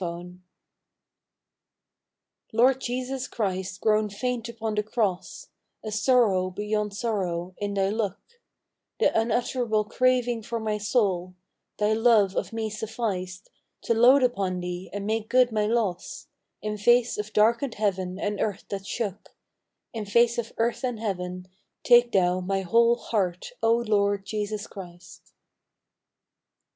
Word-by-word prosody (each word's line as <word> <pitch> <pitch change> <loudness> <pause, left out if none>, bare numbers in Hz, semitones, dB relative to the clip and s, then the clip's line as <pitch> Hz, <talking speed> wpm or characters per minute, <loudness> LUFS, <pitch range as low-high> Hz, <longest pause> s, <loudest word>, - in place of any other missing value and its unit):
T 175 +1 -6 2.2
ORD 260 +2 +4
JESUS 255 +1 -3
CHRIST 190 -4 -3
grown 215 -1 +2
faint 240 +3 -3
^ 215 -1 -1
Cross, 200 -6 -2 0.3
A 215 - -5
sorrow 210 -5 +3
beyond 210 +2 -2
sorrow 185 -6 -2
in 205 -1 -3
Thy 195 -1 +1
look, 205 -2 -1 0.8
The - - +3
unutterable 230 -1 +1
craving 245 0 +1
for 230 +2 -4
my 215 -1 -2
soul, 195 -5 0 0.4
Thy 210 +1 +2
love 220 -4 +4
of - - -2
me 220 -1 -3
sufficed 205 -4 -4 0.3
To - - +1
load 250 +4 +6
upon 195 -7 0
Thee 180 +1 -5
and 200 0 -5
make 220 0 -2
good 250 -1 +4
my 210 -1 +1
loss 215 -6 -2 0.4
In 210 0 -3
face 240 +1 +3
of 210 0 -4
darkened 230 +4 +2
heaven 190 -3 -1
and 205 0 -2
earth 205 -3 -2
that 195 -1 -5 1.1
In 220 -2 -4
face 235 +3 +3
of 230 -1 -4
earth 235 +3 0
and 245 -3 -2
heaven, 180 -4 -4 0.4
take 240 0 +6
Thou 180 -2 +2 0.7
Heart, 185 - -1
O 225 - +3
Lord 205 -4 +1
Jesus 210 0 -3
Christ. 175 -4 -12
210 Hz, 125 wpm, -26 LUFS, 195-235 Hz, 2.2 s, load